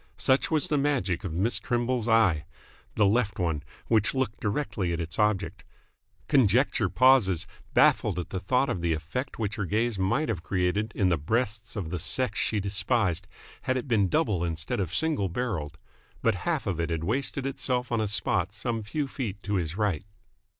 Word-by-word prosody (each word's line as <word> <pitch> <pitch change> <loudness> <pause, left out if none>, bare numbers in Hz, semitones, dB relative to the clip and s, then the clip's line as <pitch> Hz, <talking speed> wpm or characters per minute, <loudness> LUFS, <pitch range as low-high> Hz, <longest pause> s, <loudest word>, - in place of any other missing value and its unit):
Such 130 +1 +2
was 155 -3 +1
the 150 -1 +1
magic 135 - 0
of - - -3
Miss 95 +9 0
Trimble's 120 -1 -1
eye 95 -9 +3 0.5
the 105 - +4
left 105 0 +2
one, 80 -5 0 0.2
which 110 +2 +2
looked 130 -5 -1
directly 100 -5 -1
at 85 - -2
its 85 +4 -4
object. 95 -5 0 0.6
Conjecture 120 -4 +3
pauses 110 -10 +4 0.3
baffled - - +4
at 90 - -4
the 95 - -2
thought 125 +8 +1
of 110 -9 -2
the 85 -1 +1
effect 85 - -4
which 105 -2 -2
her 100 - -1
gaze 110 +2 0
might 100 +12 +1
have 105 -8 -2
created 95 +5 0
in 95 -4 +2
the 85 -4 +1
breasts 110 - -1
of 90 -7 -4
the 90 - -2
sex 110 +6 0
she 110 - +1
despised, 100 -2 0 0.3
had 130 -1 0
it 130 - -4
been 110 -6 +3
double 105 - +1
instead 80 -1 -2
of 90 -4 -1
single 140 - 0
barrelled. 85 -8 -3 0.5
But - - +4 0.2
half - - 0
of 90 -4 -2
it 85 0 -1
had 80 -1 -2
wasted 130 +7 -1
itself 125 -2 -1
on 115 -2 +1
a 110 - 0
spot 95 -2 0
some 115 +1 -2
few 140 +8 -2
feet 110 -8 -5
to 105 - -3
his 85 -2 -1
right. 105 -8 0
105 Hz, 185 wpm, -27 LUFS, 90-125 Hz, 0.6 s, the